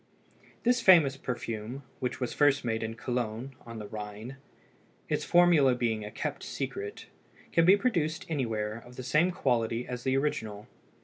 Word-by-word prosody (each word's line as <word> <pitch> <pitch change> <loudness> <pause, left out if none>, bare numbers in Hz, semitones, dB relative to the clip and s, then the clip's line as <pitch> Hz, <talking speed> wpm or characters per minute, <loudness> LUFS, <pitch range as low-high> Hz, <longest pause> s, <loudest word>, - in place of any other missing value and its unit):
This 245 0 +3
famous 165 -9 +6
perfume, 120 0 -5 0.2
which 125 - -3
was 125 -2 -2
first 145 -3 +3
made 115 -1 -1
in 110 0 -4
Cologne 120 +1 -3
on 115 -1 -7
the 105 - -6
Rhine, 105 +4 -7 0.7
its - - -1
formula 170 -7 +5
being 110 -3 -1
kept - - -3
secret, 415 +1 -5 0.5
can 165 - +4
be 190 +3 +7
produced 165 -9 0
anywhere 115 -7 -2
of 125 0 -14
the 130 - -6
same 150 +7 +3
quality 120 -8 0
as 125 -1 -5
the 130 0 +2
original. 110 -7 -2
125 Hz, 150 wpm, -29 LUFS, 115-150 Hz, 0.7 s, be